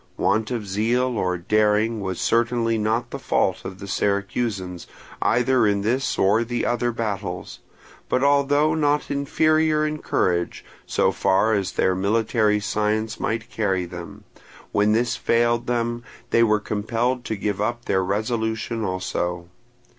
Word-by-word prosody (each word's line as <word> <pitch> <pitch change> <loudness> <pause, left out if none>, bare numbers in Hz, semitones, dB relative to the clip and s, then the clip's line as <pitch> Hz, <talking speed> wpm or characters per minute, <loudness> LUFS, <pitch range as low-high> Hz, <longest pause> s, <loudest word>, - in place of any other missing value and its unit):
Want 110 +1 +1
of 115 -5 -3
zeal 120 +6 0
or 90 -3 0
daring 105 +4 +1
was 95 -2 -3
certainly 115 -1 +1
not 115 +3 -1
the - - -5
fault - - 0
of 95 0 -7
the 100 - -8
Syracusans, 100 -2 -2 0.3
either 125 0 +3
in 100 -1 +1
this 125 +5 0
or 105 +4 +3
the 120 +1 -2
other 120 0 0
battles, 100 -5 -4 0.5
but 130 - +1
although 145 +2 +3
not 150 -2 +1
inferior 155 +2 +2
in 155 0 -3
courage, 85 -9 -1 0.2
so - - +2
far 100 +3 +2
as 95 -3 -1
their 95 - +2
military 105 +2 +1
science 110 +2 -1
might 115 +1 -3
carry 95 -4 0
them, 85 -1 -9 0.5
when 105 +1 +3
this 120 +1 +1
failed 120 0 +1
them 120 0 -1 0.3
they 115 - +4
were 110 -2 +4
compelled 115 +4 -1
to 110 - -2
give 100 -1 -2
up 120 +2 -2
their 95 -1 +1
resolution 110 +3 -2
also. 90 -2 -3
110 Hz, 145 wpm, -23 LUFS, 100-120 Hz, 0.5 s, they